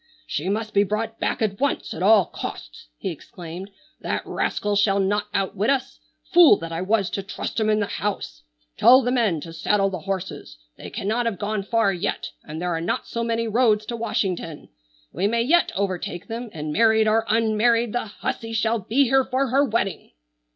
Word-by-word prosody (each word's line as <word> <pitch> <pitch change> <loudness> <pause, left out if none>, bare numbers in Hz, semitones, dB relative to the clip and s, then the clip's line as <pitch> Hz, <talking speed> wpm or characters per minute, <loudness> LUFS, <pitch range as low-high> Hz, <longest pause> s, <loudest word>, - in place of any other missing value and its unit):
"She 160 +6 -3
must 215 +2 -2
be 200 - +4
brought 220 +2 -3
back - - -1
at 200 -2 -1
once 280 0 -1
at 160 - -7
all 200 -1 +6
costs!" - - -8
he - - -3
exclaimed. 175 +3 -9 0.3
"That - - -3
rascal 205 0 -1
shall 200 -1 +3
not 205 +2 0
outwit 195 +2 0
us. 270 -1 -1 0.3
Fool 340 - +8
that 165 0 -7
I 165 +1 -3
was 200 0 +1
to 195 - -2
trust 195 +3 -5
him 215 -1 +1
in 215 0 +3
the 205 - +1
house! 195 - -4 0.4
Tell 260 +2 +7
the 245 - 0
men 220 - +1
to 165 +1 -9
saddle 195 +3 +1
the 185 - -4
horses. 190 - -5 0.2
They - - -9
cannot 225 +4 -1
have 215 -5 -2
gone 210 +1 -2
far 215 0 +1
yet, 185 +2 -3
and 155 +1 -7
there 175 0 -1
are 165 - -2
not 170 - -2
so 235 - -3
many 230 0 -1
roads 215 -2 +2
to 235 - -4
Washington. 190 -8 -3 0.4
We 200 - 0
may 230 +2 +1
yet 340 +8 +3
overtake 185 -3 -3
them, 230 +1 -5
and 150 -1 -5
married 220 +1 +4
or 220 +1 +3
unmarried 230 +1 +2
the 245 - -1
hussy 225 +2 -5
shall 225 +1 +1
be 230 +8 +2
here 265 +1 +3
for 265 +1 -1
her 275 +4 +3
wedding!" 220 -7 -2
210 Hz, 195 wpm, -23 LUFS, 190-230 Hz, 0.4 s, Fool